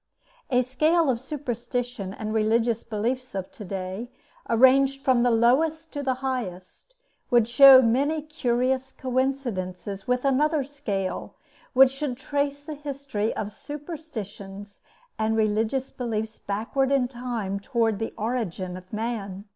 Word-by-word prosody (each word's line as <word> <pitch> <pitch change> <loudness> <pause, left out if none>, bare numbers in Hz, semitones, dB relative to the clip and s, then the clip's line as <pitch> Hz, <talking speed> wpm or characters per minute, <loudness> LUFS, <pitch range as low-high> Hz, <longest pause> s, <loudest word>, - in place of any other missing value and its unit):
A 250 -1 +3
scale 310 +4 +2
of 235 -2 -3
superstition 245 -6 -4
and 215 +2 -5
religious 225 +1 +2
beliefs 235 +3 -3
of 190 -1 -4
to 235 - -10
day, 190 +4 -5 0.4
arranged 270 +3 +4
from 255 -2 +4
the 245 - +4
lowest 300 +8 +2
to 285 - -3
the 265 -2 0
highest, 235 - -5 0.3
would 240 -4 +4
show 260 +2 +9
many 280 +7 +1
curious 260 -3 0
coincidences 235 -9 -2
with 250 +1 0
another 295 +2 +2
scale, 210 -9 -4 0.4
which 265 0 +7
should 270 -2 -3
trace 285 +1 -2
the 310 - -6
history 275 -7 -3
of 210 - -3
superstitions 215 - -8 0.4
and 220 0 +1
religious 220 +5 0
beliefs 220 -3 -3
backward 230 +7 -1
in 270 -3 +3
time 240 -6 -4
toward 225 -1 0
the 225 - -3
origin 210 -6 -2
of 185 0 -11
man. 210 -3 -4
245 Hz, 130 wpm, -26 LUFS, 215-270 Hz, 0.4 s, show